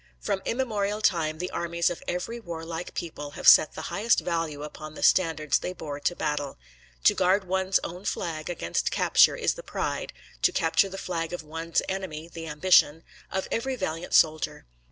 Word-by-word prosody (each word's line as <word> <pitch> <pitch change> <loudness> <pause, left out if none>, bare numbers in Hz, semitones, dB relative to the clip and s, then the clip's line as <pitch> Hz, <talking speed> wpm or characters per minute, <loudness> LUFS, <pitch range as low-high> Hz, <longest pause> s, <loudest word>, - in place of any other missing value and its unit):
From 125 - -2
immemorial 215 -5 -1
time 165 -7 +1
the 180 +2 -4
armies 170 0 0
of 175 - -6
every 230 +7 -3
warlike 165 -3 -6
people 150 -4 -5
have - - -2
set 155 - +8
the - - -6
highest 220 +3 +2
value 165 -4 -2
upon 155 0 -9
the - - -6
standards 160 -6 +3
they 180 - -4
bore 150 -5 -6
to 175 +4 0
battle. 145 -3 -2 0.5
To - - +6
guard 190 +2 +2
one's 190 +1 +1
own 180 +3 -7
flag 155 -2 -3
against 120 - -1
capture - - +4
is - - +1
the - - -9
pride, - - -3 0.3
to - - +4
capture 165 +4 +2
the 195 - -7
flag 170 -3 -3
of 175 - -5
one's 165 +2 -2
enemy 180 -5 -4
the 165 -1 -8
ambition, 160 0 +4 0.3
of 190 0 -2
every 260 +3 -1
valiant 165 -7 -3
soldier. 155 - +2
170 Hz, 175 wpm, -27 LUFS, 155-190 Hz, 0.5 s, set